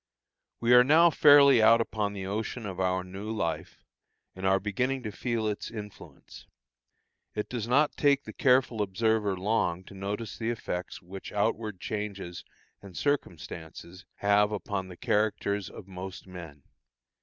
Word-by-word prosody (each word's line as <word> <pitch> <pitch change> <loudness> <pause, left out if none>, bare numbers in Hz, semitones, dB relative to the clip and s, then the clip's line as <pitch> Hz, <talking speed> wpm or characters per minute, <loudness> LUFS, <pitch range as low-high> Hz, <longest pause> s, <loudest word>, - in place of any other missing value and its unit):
We 120 +1 +3
are 125 0 +9
now 165 +6 +6
fairly 140 -4 +7
out 115 +1 +6
upon 105 -3 -2
the 95 -2 -5
ocean 110 +4 -4
of 95 -3 -6
our 95 0 0
new 95 +3 -7
life, 85 -8 -3 0.5
and 95 0 -2
are 95 0 +4
beginning 125 +7 -2
to 105 - -4
feel 115 +1 -2
its 105 -1 -3
influence. 105 -3 -11 0.9
It 105 - -2
does 120 -3 -4
not 145 +5 +2
take 140 -1 +3
the - - -9
careful 125 -4 +2
observer 105 0 0
long 95 -3 0
to 100 - -14
notice 100 +2 -5
the 115 0 -1
effects 90 -7 -5
which 95 +2 -9
outward 105 -1 -1
changes 100 -5 -5 0.4
and 95 -3 -11
circumstances 85 - -4
have 105 +1 +3
upon 100 -2 -3
the 90 -1 -11
characters 105 -2 0
of - - -11
most 95 0 -8
men. 85 -6 -10
105 Hz, 150 wpm, -28 LUFS, 95-115 Hz, 0.9 s, are